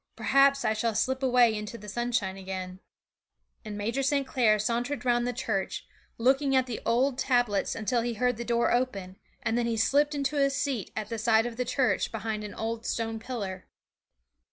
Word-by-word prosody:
Perhaps 275 0 +3
I 220 - +3
shall 220 0 -1
slip 260 +4 0
away 250 -3 +4
into 210 +2 -5
the 210 - -12
sunshine 235 -3 -1
again.' 185 -1 -6 0.8
And 210 -2 -6
Major 230 +6 -1
St. 275 +1 +1
Clair 230 -5 +3
sauntered 240 +6 -2
round 240 0 +2
the - - 0
church, 220 -5 -3 0.3
looking 270 +3 +2
at 260 -1 +4
the 245 -3 -5
old 255 +3 +2
tablets 245 -7 +1
until 230 +2 0
he 235 0 -2
heard 250 +1 +1
the 235 - -4
door 235 0 +1
open, 200 -7 -1 0.3
and 225 - 0
then 235 - 0
he 230 -1 -1
slipped 290 +6 +2
into 285 +1 -1
a 275 -1 +4
seat 275 -6 -2
at 215 -1 -4
the 230 - -3
side 220 0 +3
of 240 -1 -4
the 250 +1 -2
church 255 +1 +1
behind 220 -1 -3
an 210 - -7
old 225 0 -3
stone 225 -1 -2
pillar. 210 -6 -5
235 Hz, 190 wpm, -28 LUFS, 215-255 Hz, 0.8 s, away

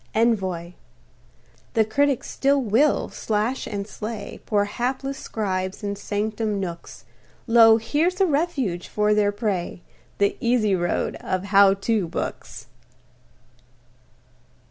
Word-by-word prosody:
ENVOY 190 -7 0 1.0
The 220 -1 +4
critics 275 +4 +1
still 280 +1 +1
will 260 +5 +2
slash 220 +4 -2
and 200 -2 -4
slay 215 0 -7
Poor 205 -2 +2
hapless 260 +5 -3
scribes, 190 -2 -3
in 200 0 -2
sanctum 210 +1 -2
nooks; 170 -3 -7 0.4
Lo! 225 -1 +7
here's 305 - 0
a 385 - +5
refuge 280 - -1
for 210 0 +1
their 210 -1 +2
prey 200 -5 -3 0.3
The 200 0 +2
easy 230 -4 +2
road 175 -1 -1
of 185 0 -3
"How 195 0 +5
To" 200 -2 0
books! - - -5
215 Hz, 115 wpm, -23 LUFS, 200-240 Hz, 1.0 s, Lo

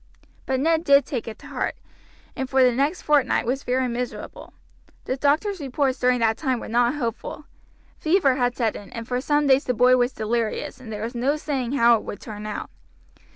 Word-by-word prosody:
But 265 -1 0
Ned 325 +3 +2
did 280 -4 +5
take 250 -5 -4
it 220 - -6
to - - -16
heart, - - -2 0.6
and 265 -1 -4
for 265 -1 +4
the 250 - +5
next 280 +8 0
fortnight 290 -5 +2
was 260 +3 -1
very 255 0 0
miserable. 245 +1 -6 0.5
The 260 - -1
doctor's 310 +9 +1
reports 270 -1 -1
during 250 0 +3
that 225 -1 +2
time 260 -4 -1
were - - -7
not 240 +3 +2
hopeful. 275 +3 -4 0.5
Fever 315 -4 +3
had 245 -1 0
set 225 -4 0
in, 205 - -10
and 230 -1 -6
for 250 0 -1
some 295 +2 +1
days 275 +1 +4
the 250 - 0
boy 250 +3 +5
was 245 +1 +2
delirious, 225 +2 -2
and 240 -4 -10
there 210 0 -5
was 230 +2 -4
no 255 +5 +1
saying 270 -5 -3
how 235 -3 +5
it - - -8
would 205 - -7
turn 210 -1 -8
out. 210 - -5
255 Hz, 205 wpm, -24 LUFS, 235-280 Hz, 0.6 s, did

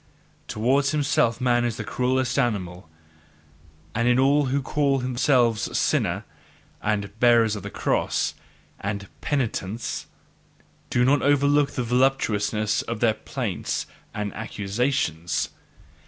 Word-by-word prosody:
Towards 135 +6 +1
himself 140 -6 +1
man 120 -2 +2
is 120 -2 -1
the 110 - -4
cruellest 130 +3 0
animal; 90 -8 -2 1.0
and 115 - +1
in 125 0 +4
all 140 +2 +4
who 135 +2 +1
call 140 0 +1
themselves 125 -3 +1
"sinners" - - +1 0.6
and 105 -1 -1
"bearers 115 -3 +5
of 105 - -6
the - - -6
cross" - - 0 0.5
and 100 0 -4
"penitents," 115 -5 -2 0.8
do 120 0 +2
not 140 +3 +4
overlook 145 0 +3
the 125 - -1
voluptuousness 110 -4 +1
in 115 - -4
their 110 0 +3
plaints 110 - -3 0.3
and 105 -2 -4
accusations! 105 - -1
120 Hz, 115 wpm, -24 LUFS, 105-135 Hz, 1.0 s, bearers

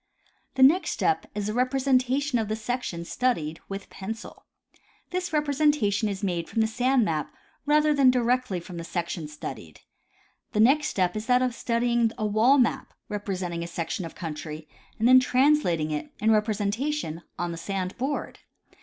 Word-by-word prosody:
The 265 - +4
next 320 +8 +5
step 405 - 0
is 210 -1 -2
the 210 - -2
representation 260 +1 +1
of 220 - -1
the 215 - -1
section 220 -7 -4
studied 165 -10 -1
with 195 0 -7
pencil. 220 +4 -8 0.6
This 365 0 -2
representation 285 -8 +1
is 200 0 -5
made 175 -4 -2
from 225 +2 0
the 220 - +3
sand 250 +1 +2
map 155 -4 -2 0.4
rather 300 0 +4
than 275 -3 +5
directly 250 -5 +1
from 175 +1 -9
the 170 - -5
section 170 -2 -4
studied. 130 - -8 0.7
The 210 - 0
next 275 +7 +5
step 180 -1 0
is 215 +1 -4
that 250 0 +4
of 250 -1 0
studying 235 -1 +1
a 215 - -1
wall 220 +7 +4
map 250 -4 0
representing 185 -5 -3
a - - -5
section 170 +2 -4
of 165 - -8
country, 155 -1 -6 0.3
and 225 - +2
then 255 +1 +8
translating 255 - +2
it, 150 -1 -3
in 220 +2 +2
representation, 210 - 0 0.2
on 175 0 -2
the 165 - -6
sand 190 0 -3
board. 275 +3 -3
220 Hz, 165 wpm, -26 LUFS, 180-255 Hz, 0.7 s, then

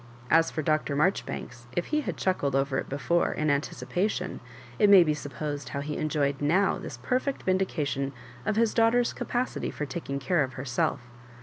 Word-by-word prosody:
As 165 0 +5
for 155 - -3
Dr. 155 -1 +1
Marjoribanks, 140 -7 -1
if 175 - +1
he 305 - +3
had 185 - -4
chuckled 145 -8 0
over 135 0 +1
it - - -6
before, 145 +6 +1
in 155 -1 +1
anticipation, 165 - -1 0.4
it 210 - +6
may 195 -3 +9
be 155 -2 +1
suppos 145 0 -4
ed - - -6
how 140 - -2
he 150 +1 -4
enjoyed 145 -3 0
now 180 +7 +2
this 120 - -7
perfeot 255 - -1
vindication 155 -7 0 0.3
of 210 - 0
his 225 0 +2
daughter's 235 +1 +3
capacity 250 +1 -2
fbr 150 - -4
takhig 140 -1 -4
care 170 +4 +1
of 130 -1 -5
her 130 +3 -6
self. 125 +1 0
155 Hz, 185 wpm, -28 LUFS, 140-190 Hz, 0.4 s, may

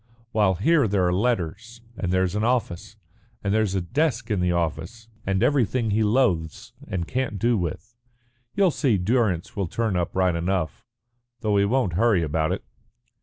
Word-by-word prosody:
While 105 -5 +2
here 140 - +3
there 100 -2 +1
are 90 - +1
letters, 115 +2 -2 0.2
and 90 -4 -3
there's 95 -1 +1
an 105 +1 -1
office, 115 -5 -1 0.5
and 100 0 0
there's 110 -3 +1
a 95 - +1
desk 120 - -1
in 105 - +1
the 90 0 +1
office 85 - -3 0.2
and 95 +2 +1
everything 125 -4 +1
he 110 +2 +2
loathes 105 - 0
and 85 -2 -3
can't 125 -5 -2
do 120 +4 +2
with. 95 +5 -4 0.6
You'll 195 -3 +4
see 130 -9 +1
Durrance 95 -3 0
will 100 -3 -1
turn 110 +2 -1
up 90 -1 -2
right 95 -1 +2
enough, 85 -3 -2 0.6
though 105 -2 +1
he 100 - +4
won't 115 -4 +1
hurry 100 -1 +3
about 80 +1 0
it." - - -3
100 Hz, 170 wpm, -24 LUFS, 90-115 Hz, 0.6 s, You'll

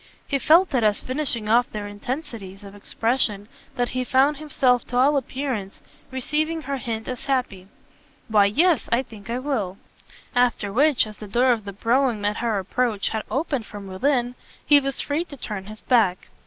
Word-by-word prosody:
He 275 - 0
felt 325 +5 +5
it 250 -3 +2
as 210 -1 +3
finishing 255 -5 -3
off 240 +3 +3
their 210 -1 -5
intensities 205 -3 -6
of 200 -1 -10
expression 210 0 -1 0.3
that 245 -2 0
he 255 0 -2
found 275 +3 +3
himself 265 -5 +2
to 245 - -2
all 275 +4 +4
appearance 260 -7 -3 0.3
receiving 305 +5 -1
her 275 0 -3
hint 230 -4 -4
as 250 -2 -5
happy. 250 -9 -1 0.6
"Why 210 -2 +5
yes 320 - +2
I 235 +3 +3
think 215 -4 -13
I 235 - -1
will": 240 -9 -2 0.6
after 240 -5 +1
which, 285 +2 +4
as 215 -1 -11
the 210 - -8
door 245 +5 +3
of 225 -4 -1
the 200 - -6
brougham, 230 0 +1
at 210 0 0
her 230 -3 0
approach, 210 +2 0
had 220 - -2
opened 275 -5 -2
from 205 -2 -9
within, 245 +6 0 0.3
he 290 -1 +7
was 275 -1 -2
free 295 +3 -1
to 285 - -11
turn 205 -6 -6
his 215 0 -10
back. 215 -8 +2
245 Hz, 180 wpm, -23 LUFS, 210-275 Hz, 0.6 s, he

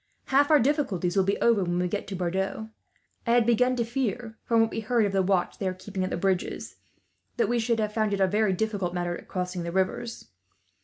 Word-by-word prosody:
"Half 285 +1 +5
our 305 -2 +6
difficulties 225 - 0
will 195 - +4
be 200 - 0
over, 230 -4 +4
when 175 0 -1
we 180 0 +1
get 200 +3 -3
to 195 - -5
Bordeaux. 190 +4 -2 0.6
I 235 - +3
had 240 -1 +4
begun 250 +2 +3
to 235 -2 0
fear, 235 -2 -3
from 230 -1 +3
what 225 -1 +1
we - - -3
heard 225 0 +1
of 200 - -1
the 195 0 +2
watch 185 -1 0
they 195 - -1
are 185 - -2
keeping 190 0 -5
at 185 - -1
the - - -2
bridges, 190 0 -2 0.6
that 230 -3 +2
we 240 +2 +1
should 230 0 +1
have 210 -1 -1
found 215 -1 +1
it 200 - -1
a 190 - +5
very 205 +1 +1
difficult 195 -3 -2
matter 175 -1 -3
crossing 180 -1 -3
the 170 0 -4
rivers. 190 +5 -2
205 Hz, 235 wpm, -27 LUFS, 185-230 Hz, 0.6 s, our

